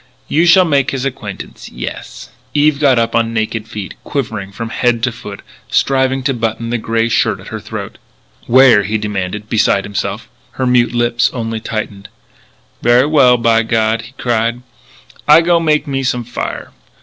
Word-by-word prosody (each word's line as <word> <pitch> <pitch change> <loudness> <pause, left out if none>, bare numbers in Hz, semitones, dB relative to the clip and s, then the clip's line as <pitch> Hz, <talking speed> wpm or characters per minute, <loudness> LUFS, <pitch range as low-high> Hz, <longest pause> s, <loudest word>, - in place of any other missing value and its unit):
You 165 +3 +2
shall 185 +1 +6
make 140 -4 +1
his 135 -1 -3
acquaintance. 105 -7 -7
Yes!" - - -7 0.3
Eve 145 -1 +3
got 140 -4 +4
up 115 0 0
on 115 0 +1
naked 110 0 -2
feet, 105 -4 -7
quivering 110 -9 -4
from 115 +3 -6
head 115 0 0
to 125 - +1
foot, 105 -4 -10 0.3
striving 130 -1 +1
to 135 0 +1
button 115 -1 -3
the 120 - -1
grey 115 +1 0
shirt 115 - +1
at - - -11
her - - -5
throat. - - -7 0.5
"Where?" 125 -3 +6
he 105 +3 -1
demanded, 105 0 -4
beside 105 -3 +2
himself. 100 -1 -4 0.3
Her 130 - -2
mute 125 -1 +2
lips 120 0 +2
only 115 -2 -3
tightened. 110 -3 -5 0.7
"Ver' 120 +3 +4
well, 135 -5 +5
by 115 -1 +3
God!" 110 0 0
he 115 +3 -13
cried. 120 -1 -1 0.6
"I 150 +2 +7
go 170 0 +3
make 155 -2 +1
me 135 -2 -2
some 125 -2 -1
fire. 120 - -5
115 Hz, 170 wpm, -15 LUFS, 110-135 Hz, 0.7 s, I